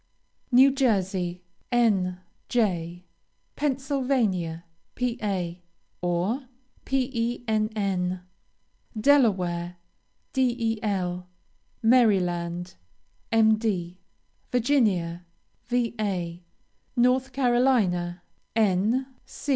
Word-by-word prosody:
New 260 Hz, +3 st, +7 dB
Jersey, 190 Hz, -9 st, 0 dB, 0.3 s
N. 195 Hz, -7 st, +2 dB, 0.3 s
J. 175 Hz, -6 st, 0 dB, 0.5 s
Pennsylvania, 255 Hz, -, 0 dB, 0.3 s
Pa., 210 Hz, -8 st, -2 dB, 0.5 s
or, 180 Hz, +10 st, -1 dB, 0.4 s
Penn. 220 Hz, -7 st, -1 dB, 0.8 s
Delaware, 185 Hz, -10 st, +2 dB, 0.6 s
Del. 220 Hz, -8 st, -1 dB, 0.6 s
Maryland, 180 Hz, -7 st, +2 dB, 0.6 s
Md. 215 Hz, -5 st, +2 dB, 0.5 s
Virginia, 215 Hz, -10 st, +1 dB, 0.4 s
Va. 210 Hz, -8 st, -1 dB, 0.6 s
North 255 Hz, +2 st, +3 dB
Carolina, 240 Hz, -9 st, +2 dB, 0.3 s
N. 220 Hz, +4 st, +2 dB
215 Hz, 50 wpm, -26 LUFS, 180-245 Hz, 0.8 s, New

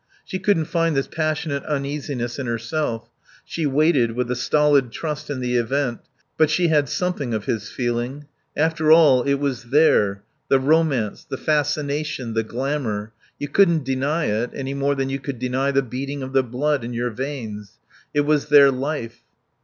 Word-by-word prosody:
She 185 Hz, -, -4 dB
couldn't 185 Hz, -4 st, +2 dB
find 165 Hz, -2 st, 0 dB
this 135 Hz, -, +1 dB
passionate 155 Hz, -3 st, -2 dB
uneasiness 140 Hz, -4 st, -3 dB
in 130 Hz, -, -3 dB
herself; 115 Hz, +1 st, -2 dB, 0.4 s
she 160 Hz, -3 st, -2 dB
waited 140 Hz, -4 st, +2 dB
with 125 Hz, +1 st, -2 dB
a -, -, 0 dB
stolid 145 Hz, -1 st, +2 dB
trust 150 Hz, +2 st, -5 dB
in 135 Hz, -3 st, -3 dB
the 125 Hz, 0 st, 0 dB
event; 120 Hz, +1 st, 0 dB, 0.4 s
but 155 Hz, -1 st, +5 dB
she 170 Hz, +2 st, +2 dB
had 150 Hz, -4 st, +2 dB
something 150 Hz, -10 st, -2 dB
of 105 Hz, -, -4 dB
his 110 Hz, -2 st, -2 dB
feeling. 120 Hz, +3 st, -3 dB, 0.3 s
After 160 Hz, 0 st, +2 dB
all, 150 Hz, -6 st, +7 dB
it 140 Hz, +2 st, +1 dB
was 140 Hz, -4 st, -2 dB
there, 110 Hz, -8 st, +3 dB, 0.2 s
the 135 Hz, -, +4 dB
romance, 140 Hz, -6 st, +1 dB
the 135 Hz, -, -6 dB
fascination, 150 Hz, -3 st, -1 dB
the 115 Hz, -, +1 dB
glamour; 115 Hz, -3 st, -3 dB, 0.2 s
you 145 Hz, -, -4 dB
couldn't 170 Hz, -2 st, +3 dB
deny 140 Hz, +5 st, 0 dB
it 110 Hz, +4 st, 0 dB
any 135 Hz, 0 st, -4 dB
more 140 Hz, +1 st, 0 dB
than 135 Hz, -1 st, -1 dB
you 135 Hz, -, -2 dB
could 140 Hz, -1 st, -5 dB
deny 130 Hz, +3 st, -1 dB
the 135 Hz, 0 st, +2 dB
beating 135 Hz, +3 st, -5 dB
of 130 Hz, +1 st, -7 dB
the 135 Hz, -, +5 dB
blood 130 Hz, +3 st, -1 dB
in 120 Hz, +1 st, -5 dB
your 120 Hz, +1 st, -1 dB
veins. 110 Hz, -5 st, -6 dB, 0.4 s
It 145 Hz, -, +2 dB
was 150 Hz, 0 st, +1 dB
their 140 Hz, -1 st, +8 dB
life. 130 Hz, -3 st, -4 dB
140 Hz, 175 wpm, -22 LUFS, 125-150 Hz, 0.4 s, their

